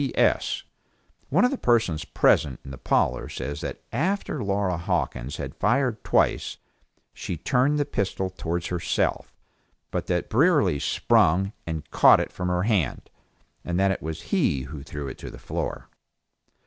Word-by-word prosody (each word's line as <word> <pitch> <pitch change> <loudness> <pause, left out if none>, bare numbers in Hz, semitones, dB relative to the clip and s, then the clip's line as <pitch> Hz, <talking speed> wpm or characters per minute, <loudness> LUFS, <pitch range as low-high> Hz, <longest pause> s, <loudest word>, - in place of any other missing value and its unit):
P. 135 - -4
S. - - +2 0.7
One 185 - +4
of 250 - +2
the 275 - -3
persons 110 -10 +2
present 70 -4 +2
in 70 - -8
the 65 - -9
parlor - - +1
says 70 +3 -5
that - - -6
after 155 - -1
Laura 100 -2 0
Hawkins 70 -5 -2
had - - -5
fired 120 +1 +1
twice, - - +1 0.6
she 85 - -5
turned 135 - +2
the 145 - +1
pistol 95 -7 -2
towards 85 -1 -3
herself, 90 -1 -1 0.6
but - - -3
that 90 -1 0
Brierly 145 - +3
sprung 95 +8 +2
and 80 -2 -4
caught - - +7
it - - -2
from 90 - -4
her 90 0 +1
hand, 100 - 0 0.5
and 85 +1 -1
that 95 0 +3
it 95 - -3
was 80 +1 -5
he 85 - +2
who 70 +1 -8
threw 70 0 -6
it 65 - -8
on - - -5
the - - -11
floor. - - -4
95 Hz, 160 wpm, -25 LUFS, 80-125 Hz, 0.7 s, caught